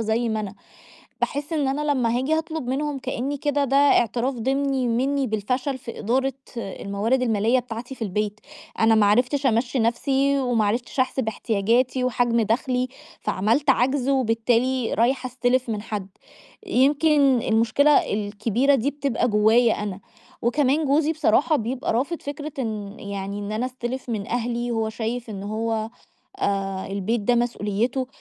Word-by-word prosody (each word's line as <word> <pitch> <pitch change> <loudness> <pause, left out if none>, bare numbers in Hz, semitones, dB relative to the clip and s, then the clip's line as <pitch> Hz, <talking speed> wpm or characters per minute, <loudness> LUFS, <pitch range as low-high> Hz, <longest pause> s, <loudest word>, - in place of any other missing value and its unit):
زي 225 +2 0
ما 220 -1 -1
أنا. 205 -1 -6 0.7
باحِس 290 +3 -2
إن 290 -4 +1
أنا 290 +2 0
لمّا 240 -2 +1
هاجي 285 +5 +1
هاطلُب 320 -4 -3
منهم 285 +1 -1
كإنّي 260 +2 -3
كده 290 0 0
ده 275 +1 +1
اعتراف 255 -2 +3
ضِمني 265 +2 0
مِنّي 270 +4 +1
بالفشل 250 +5 -2
في 235 - -9
إدارة 260 +5 0 0.2
الموارد 210 +4 -1
المالية 225 +2 +2
بتاعتي 245 +1 -6
في 245 - -9
البيت. 210 +1 -2 0.4
أنا 225 0 +5
ما 215 -2 +4
عرفتش 250 +6 +2
أمَشّي 245 +2 +1
نَفْسي 270 +4 +1
وما 245 -4 +1
عرفتش 235 +5 -1
أحسب 255 -2 0
احتياجاتي 235 +4 +1
وحجم 240 -1 +1
دَخْلي، 250 +3 0 0.3
فعملْت 230 +9 +1
عَجْز 265 +1 +1
وبالتالي 245 0 +1
رايحة 255 +3 +1
أستِلف 255 0 0
من 210 -2 -2
حد. 205 -3 -5 0.6
يمكن 280 -2 +3
المشكلة 230 +6 +3 0.2
الكبيرة 215 +6 +1
دي 270 +3 +1
بتبقى 280 -4 -1
جوايّا 220 +2 +3
أنا. 200 -2 -5 0.4
وكمان 280 +5 +2
جوزي 295 +3 +2
بصراحة 295 +1 +2
يبقى 255 0 -2
رافض 280 +9 -1
فكرة 290 +1 -6
إن 210 -4 -4
يعني 200 0 -5
إن 205 +1 -5
أنا 235 +4 -1
أستِلف 255 0 -5
من 215 -4 -3
أهلي، 240 0 -2
هو 225 -1 0
شايف 230 +1 -4
إن 195 -2 -6
هو 220 +1 -2 0.5
آآ 195 - -1
البيت 200 +4 -1
ده 240 +4 +2
مسؤوليّته 240 +2 -1
245 Hz, 150 wpm, -23 LUFS, 220-270 Hz, 0.7 s, أنا